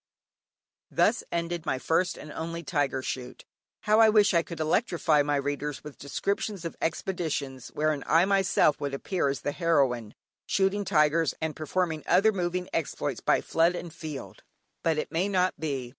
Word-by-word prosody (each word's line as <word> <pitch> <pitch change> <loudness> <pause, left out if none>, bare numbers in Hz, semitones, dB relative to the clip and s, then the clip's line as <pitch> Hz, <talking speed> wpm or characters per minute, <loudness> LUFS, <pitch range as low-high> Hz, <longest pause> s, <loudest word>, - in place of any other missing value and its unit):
Thus - - +2
ended 170 0 -2
my 130 - +1
first 175 +6 0
and 150 - -9
only 165 +2 -5
tiger 145 -4 -1
shoot. 125 -1 -6 0.4
How 215 +1 +3
I 225 -1 +7
wish 210 -2 +4
I 170 - +4
could 170 0 -8
electrify 160 -2 +2
my 145 0 0
readers 145 +1 -3
with 150 -2 -10
descriptions 195 +6 -3
of 165 - -4
expeditions 150 -8 -2
wherein 150 -1 +1
I 165 +3 +5
myself 195 -5 +3
would 140 -1 -2
appear 175 +2 -1
as 135 - -3
the 145 - -1
heroine, 135 - +1 0.3
shooting 200 +1 +1
tigers, 160 -2 +2
and 160 -1 -3
performing 160 +1 -1
other 195 +5 +5
moving 180 -2 -2
exploits 165 -3 -2
by - - +2
flood 170 +2 +2
and 175 -2 -6
field. 155 -4 -8 0.4
But 165 -2 +1
it 155 - -3
may 175 +5 0
not 185 -1 +1
be. 135 -6 -3
165 Hz, 165 wpm, -28 LUFS, 145-180 Hz, 0.4 s, I